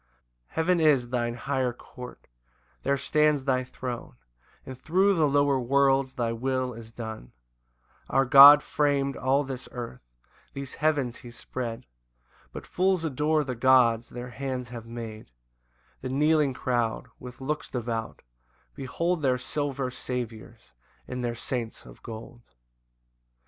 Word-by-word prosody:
2 - - -41 0.5
Heaven 170 +2 +2
is 140 -6 +3
thine 120 -1 -1
higher 130 0 -1
court; 125 +1 -11 0.6
there 140 0 +1
stands 150 0 +2
thy 130 -2 +1
throne, 125 - -7 0.5
And 130 - -7
thro' 185 +9 +2
the 160 -5 +3
lower 140 -1 +3
worlds 135 +1 +2
thy 120 -3 -1
will 130 +2 -1
is 115 0 -11
done: 110 - -8 0.8
Our 135 0 +3
God 140 +3 +10
fram'd 140 -2 0
all 135 +2 +1
this 130 -2 -7
earth, 65 - -8 0.4
these 140 -1 -6
heavens 145 -6 +1
he 120 - -11
spread, 120 -1 -6 0.7
But - - -8
fools 185 -1 +1
adore 150 +1 +1
the 130 -2 -4
gods 120 -2 +4
their 125 0 -7
hands 130 -2 -4
have 115 -2 -8
made: 115 - -8 0.7
The 130 - -4
kneeling 150 0 +2
crowd, 120 -3 -1
with 125 0 -10
looks 150 +3 -3
devout, 115 -2 -4 0.5
behold 165 +6 -2
Their 130 -3 +2
silver 135 0 -3
saviours, 120 - -6 0.3
and 125 -1 -4
their 120 -1 -2
saints 115 -1 -5
of - - -14
gold. 115 +1 -9
130 Hz, 135 wpm, -27 LUFS, 120-140 Hz, 0.8 s, God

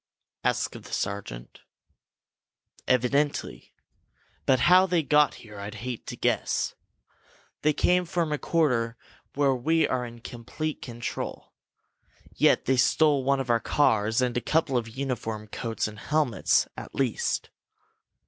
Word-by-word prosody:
asked - - 0
the - - -13
sergeant. 95 -12 -4 1.3
"Evidently! 140 +4 0 0.7
But 130 -2 +4
how 185 +6 +6
they 175 -3 +1
got 150 0 +3
here 105 -2 -12
I'd 100 +2 -6
hate 120 +2 -6
to - - -5
guess! - - 0 0.9
They 150 - +3
came 180 +4 +2
from 170 -2 -1
a 150 - -1
quarter 125 -8 +1 0.4
where 140 -1 +3
we 160 +6 +2
are 125 -1 -1
in 120 -1 -9
complete 135 +7 -5
control. 120 -1 -6 0.8
Yet - - +3
they 130 0 +2
stole 140 +2 +3
one 140 +1 +2
of 130 -2 -1
our 115 - +3
cars, 110 -4 +2
and 125 -1 -1
a 120 - 0
couple 155 -2 +1
of 115 -2 0
uniform 115 -4 -4
coats 115 0 -3
and 105 -1 -9
helmets, 145 -6 +1
at - - -9
least!" 130 -5 -1
125 Hz, 135 wpm, -27 LUFS, 115-150 Hz, 1.3 s, how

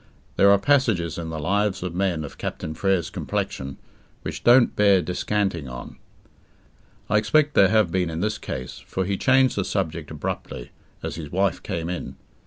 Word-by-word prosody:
There 100 - +5
are 100 - +7
passages 105 - +1
in 80 -1 -5
the 80 - -4
lives 100 +3 0
of 90 -2 -4
men 90 -3 0
of 70 - -11
Captain 80 - -4
Frere's 95 0 0
complexion, 65 0 -3 0.5
which - - -5
don't 120 +1 +6
bear 100 -2 +5
descanting 90 -4 -1
on. 60 - -9 1.1
I 105 0 +3
expect 150 +7 +2
there 95 - +6
have 110 -4 +3
been 90 -1 0
in 80 0 -4
this 105 +3 -1
case, 65 -1 -6
for 95 - -3
he 100 +1 -1
changed 130 +5 +3
the 100 - 0
subject 95 -4 -3
abruptly, - - -5 0.3
as - - -4
his 75 -3 -7
wife 95 -1 +1
came 85 -4 -4
in. 90 0 -5
95 Hz, 175 wpm, -24 LUFS, 85-105 Hz, 1.1 s, are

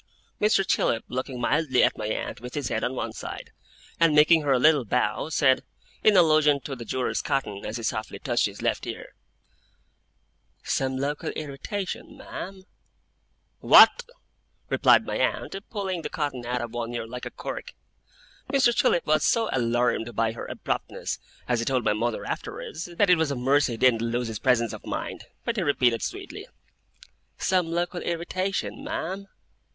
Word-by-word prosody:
Mr. 210 -2 +3
Chillip, 115 -10 +1
looking 130 0 -4
mildly 130 0 +2
at - - +3
my 105 - -4
aunt 110 - -4
with 125 +1 -8
his 145 -5 -2
head 110 - -1
on 130 - -1
one 115 -2 -3
side, - - -7 0.5
and 165 -3 +4
making 155 +2 +6
her 145 -2 0
a 130 - +5
little 150 +1 +5
bow, 115 +3 0
said, 135 -5 +3 0.4
in 210 -2 +6
allusion 155 -4 +5
to 135 0 -6
the 120 -2 -8
jewellers' 130 +3 -1
cotton, 135 -9 -2
as 105 +3 -4
he 115 - -7
softly 110 -1 -3
touched - - +1
his - - -9
left - - -1
ear: - - -7 1.5
'Some 130 -1 -1
local 145 +2 -2
irritation, 155 +7 -5
ma'am?' 190 0 -8 1.0
'What!' 485 - +7 0.6
replied - - +5
my - - -2
aunt, - - -1
pulling 190 -5 -3
the - - -4
cotton 135 -6 -3
out 125 0 -1
of 120 - -6
one 120 -1 -3
ear 120 - -3
like 125 +2 -6
a - - -5
cork. - - -7 0.8
Mr. 260 -4 +4
Chillip 170 - +2
was 155 0 +2
so 225 -2 +2
alarmed 120 -1 0
by 115 0 +1
her 115 - -7
abruptness - - -4 0.3
as 120 -1 +1
he 115 - -1
told 130 -1 +1
my 105 - +3
mother 115 +2 -2
afterwards 160 - -5
that 180 +2 +2
it 175 - +5
was 160 -2 +1
a 140 - -1
mercy 135 +1 +2
he - - -5
didn't 115 -2 +4
lose 120 +1 -1
his 110 - -5
presence 120 -4 +2
of - - -9
mind. - - -5 0.2
But 235 -1 -1
he - - +1
repeated 125 -7 +2
sweetly: - - -6 0.9
'Some 185 -2 +1
local 175 +1 -2
irritation, 185 +3 -3
ma'am? 190 +4 -4
135 Hz, 170 wpm, -26 LUFS, 120-170 Hz, 1.5 s, What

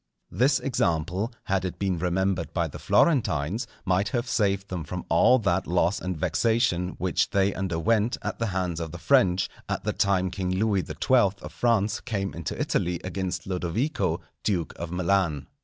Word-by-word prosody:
This 130 - +3
example, 90 - 0
had 95 -1 0
it 95 - -4
been 95 -4 -1
remembered 90 0 -1
by 85 -2 +1
the 75 - -9
Florentines, 110 - +2 0.2
might 95 +2 +1
have 120 +3 -1
saved 100 -4 0
them 90 -3 -3
from - - -6
all 130 - +5
that 95 -5 0
loss 90 +2 +2
and 90 -2 -3
vexation 110 -1 +1
which 95 -1 0
they 100 0 +2
underwent 95 +6 0
at 105 - -4
the 115 - 0
hands 90 -3 -2
of 80 -2 -4
the 85 - -7
French, 95 -5 +3 0.2
at - - -2
the - - -1
time 95 -2 +1
King 95 -2 -3
Louis 100 -2 +1
XII. 115 -7 +2
of - - -8
France 110 -3 +1
came 100 -3 -3
into 85 -1 -5
Italy 85 0 0
against 95 0 -3
Lodovico, 95 - -1 0.2
duke 90 -6 -1
of 85 - -6
Milan. 90 -5 +1
95 Hz, 170 wpm, -26 LUFS, 90-105 Hz, 0.2 s, all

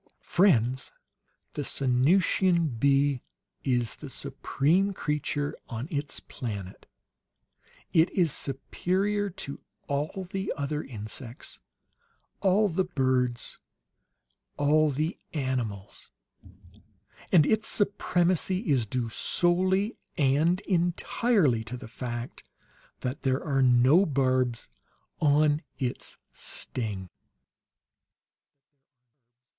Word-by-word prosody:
Friends, 130 - +2 0.6
the 150 - -3
Sanusian 155 - +2
bee 140 -1 +3 0.4
is 120 -4 +1
the - - -8
supreme 180 +8 0
creature 145 -2 -2
on 115 +3 -4
its 145 -2 -2
planet; 100 -7 -7 1.1
it 165 +2 +5
is 175 -5 +2
superior 195 +9 -1
to 140 -6 -7 0.3
all 150 +7 -2
the 190 0 -2
other 150 +1 -2
insects, 115 +1 -8 0.8
all 200 +2 +3
the 190 0 +1
birds, 130 -7 0 1.0
all 150 +2 +4
the 155 +5 -2
animals; 125 -9 -3 1.2
and 160 -5 +6
its 220 +6 +1
supremacy 185 -1 +1
is 125 -6 +2
due 120 +1 -1
solely 185 - +1 0.2
and 155 +6 +3
entirely 175 - +1
to 125 +3 -6
the 120 - -9
fact 120 0 -6 0.6
that 130 +4 -3
there 130 0 0
are 135 -3 +1
no 130 +9 +5
barbs 130 -4 +1 0.5
on 150 0 +3 0.2
its 125 -2 -3 0.2
sting!" 105 -6 -4
145 Hz, 90 wpm, -28 LUFS, 125-175 Hz, 1.2 s, and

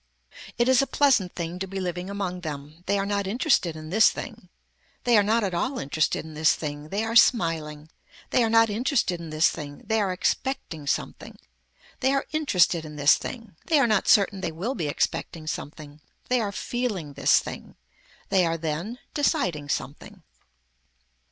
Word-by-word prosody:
It 240 +1 +2
is 260 -1 +5
a 275 - -1
pleasant 255 -11 +2
thing 170 +1 -4
to 195 - -3
be 195 +1 -5
living 180 0 -4
among 190 -3 -4
them. 150 0 -7
They 200 - +2
are 195 - -1
not 200 -1 -1
interested 210 - +1
in 155 0 -9
this 220 +3 +6
thing. - - -8 0.5
They 240 -1 +3
are 210 - +7
not 220 +3 +1
at 190 -3 -1
all 250 +10 -1
interested 155 - -1
in 160 - -10
this 155 +1 +3
thing. 145 0 -6
They 200 +5 -1
are 225 +1 -3
smiling. 160 -10 +3 0.4
They 245 - +3
are 225 - +1
not 225 0 +5
interested 225 - 0
in 165 -1 -8
this 155 +2 +3
thing. 145 -2 -8
They 220 0 +1
are 195 -2 0
expecting 180 - -2
something. - - -3 0.6
They 265 +1 +2
are 275 - 0
interested 185 - +2
in 150 -1 -9
this 145 0 +5
thing. 230 -8 -8
They 320 - +4
are 280 - +4
not 215 -4 +1
certain 200 -1 +4
they 165 - -2
will 190 +11 -3
be 165 - -3
expecting 155 +2 -2
something. 150 -1 -7 0.3
They 250 -1 +2
are 205 -2 -2
feeling 205 - -3
this - - +4
thing. - - -5 0.5
They 190 -2 +3
are 165 -1 0
then 165 +9 -4 0.2
deciding 185 - 0
something. 180 +8 -5
185 Hz, 185 wpm, -25 LUFS, 155-225 Hz, 0.6 s, are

